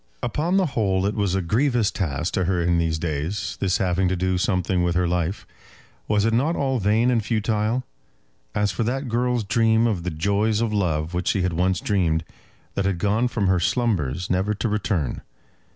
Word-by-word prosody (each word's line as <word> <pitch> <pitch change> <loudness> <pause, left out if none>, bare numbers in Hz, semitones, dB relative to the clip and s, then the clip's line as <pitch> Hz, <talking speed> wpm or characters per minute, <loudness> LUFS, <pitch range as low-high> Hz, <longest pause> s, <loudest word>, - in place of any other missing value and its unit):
Upon 155 - 0
the 190 - +3
whole 100 - 0
it 100 - 0
was 100 -3 0
a 95 - 0
grievous 120 +3 +1
task 85 -2 -2
to 95 -3 +1
her 90 0 +1
in 85 0 +2
these 80 -1 0
days, 80 +4 -3
this 95 -2 +1
having 95 0 +1
to 95 - +1
do 90 0 0
something 90 -1 0
with 90 -1 0
her 90 0 +2
life. 90 +2 -2 0.6
Was 105 0 +2
it 115 - +1
not 145 +9 +2
all 135 -2 0
vain 110 +4 +2
and 115 -3 +1
futile? 110 +2 0 0.7
As 105 0 +1
for - - -3
that 130 +3 -1
girl's 120 0 0
dream 115 +2 +3
of 105 -7 0
the 90 - -3
joys 100 +6 0
of 115 -2 0
love 85 -5 0
which 90 0 -2
she 95 - +1
had 90 -1 0
once 90 +2 +1
dreamed, 85 -6 +1 0.5
that 100 - -1
had 95 -2 0
gone 105 +7 +1
from 115 -4 -1
her 95 -1 +3
slumbers, 90 - 0
never 95 +4 0
to 110 - -2
return. 100 - -1
100 Hz, 200 wpm, -23 LUFS, 90-115 Hz, 0.7 s, the